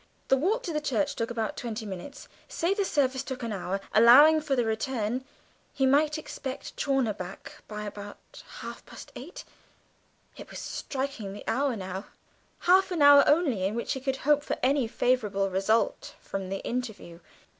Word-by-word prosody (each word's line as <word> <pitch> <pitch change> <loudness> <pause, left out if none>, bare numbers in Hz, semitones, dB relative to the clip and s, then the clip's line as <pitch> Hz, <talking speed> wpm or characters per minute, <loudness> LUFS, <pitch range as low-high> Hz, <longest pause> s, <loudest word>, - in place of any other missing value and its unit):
The 270 - +6
walk 385 - 0
to 305 -3 -2
church 235 -9 0
took 230 - -2
about 225 -2 -3
twenty 225 -2 -5
minutes; 205 +8 -8 0.2
say 340 +4 0
the 400 0 0
service 265 -6 +1
took 260 -2 -6
an 230 -2 -3
hour, 195 0 -3
allowing 280 +9 +8
for 290 -3 0
the 245 -2 +1
return, 225 +1 -2 0.5
he 270 - +1
might 295 +3 +3
expect 270 -3 -7
Chawner 270 -6 +1
by 200 +2 -8
about 205 0 -9 0.2
half - - -8
past - - -11
eight; - - -9 0.9
it - - -11
was - - -9
striking 260 -8 -4
the 205 - -9
hour 270 +1 +1
now 190 -1 -6 0.6
half 375 +2 +4
an 340 -5 +1
hour 285 0 +9
only 290 - +2
in 195 +3 0
which 235 - -2
he 265 - -4
could 265 0 -1
hope 295 0 +4
for - - -3
any 265 -1 +2
favourable 210 -5 0
result 195 +5 0
from 195 -1 -5
the 195 0 -5
interview! 220 -9 -5
250 Hz, 165 wpm, -28 LUFS, 210-285 Hz, 0.9 s, hour